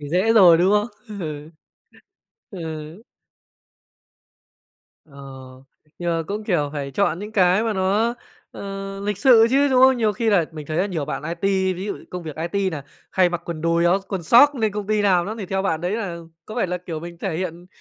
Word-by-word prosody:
Thì 145 - -7
dễ 185 +8 +2
rồi, 180 -7 +7
đúng 185 +3 +3
không? 210 +2 +2 0.3
Ừ. 150 -1 -6 1.0
Ừ. 160 +1 -7 2.0
Ờ, 145 -3 -19 0.8
nhưng 175 -1 -2
mà 165 0 0
cũng, 210 +4 -4
kiểu, 155 -8 0
phải 140 -2 -4
chọn 200 +2 0
những 210 +2 -8
cái 185 0 +3
mà 225 - 0
nó, 205 +4 +1 0.4
ờ, 195 0 -7
lịch 205 -1 -3
sự 230 -1 +6
chứ, 280 +2 +3
đúng 260 -1 +4
không? 265 0 +6
Nhiều 220 -3 +1
khi 225 +3 0
là 190 -5 +3
mình 155 -2 -8
thấy 155 - -4
là 190 - +2
nhiều 170 -7 -3
bạn 135 0 -5
IT, 190 +3 0
ví 185 - -5
dụ 205 - -4
công 180 -1 -6
việc 155 -3 -8 0.2
IT 200 -1 0
nà 145 -3 -5 0.3
hay 185 -1 +3
mặc 175 0 -4
quần 165 -2 -5
đùi 165 +1 +1
áo 175 +3 +4
quần 190 -3 -3
soóc 285 - +6
lên 220 -5 0
công 205 -1 -4
ty 215 0 +1
làm 185 -4 +3
lắm, 215 +2 -5
thì 200 - -5
theo 190 +1 -1
bạn 165 -5 -1
đấy 180 +3 -2
là 195 -7 -4 0.3
có 215 - -9
phải 235 - 0
là, 180 0 -3
kiểu, 170 -3 -6
mình 170 +1 -9
thể 180 -3 -3
hiện 175 0 -5
185 Hz, 210 wpm, -22 LUFS, 170-210 Hz, 2.0 s, rồi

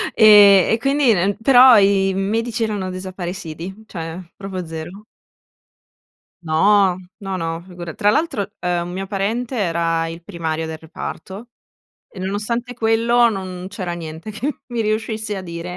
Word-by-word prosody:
E 205 -3 +8
e 225 - +3
quindi 275 -1 +3
n 195 +2 0
però 250 0 +8
i 195 -1 +3
medici 225 +4 -1
erano 205 -4 -2
desaparecidi; 185 0 -7
cioè 165 -2 -6 0.2
proprio 190 -2 -6
zero. 165 +6 -8 1.4
No, 190 +3 +3 0.2
no, 195 -3 -5
no, 165 -1 -3
figura 175 -2 -8
tra 205 +4 +2
l'altro, 220 -7 -1
ehm, 175 -1 -1
un 175 - -7
mio 195 +1 -4
parente 225 +6 -2
era 165 -4 0
il 165 +1 -8
primario 165 -4 -3
del 160 0 -6
reparto 190 +7 -8 0.6
e 195 - -14
nonostante 210 +6 -3
quello 235 +1 +3
non 185 -3 -6
c'era 190 -3 -5
niente 165 +3 -7
che 255 +7 -4
mi 240 -2 -2
riuscisse 215 0 -2
a - - -5
dire, 170 -1 -7
195 Hz, 145 wpm, -20 LUFS, 175-220 Hz, 1.4 s, E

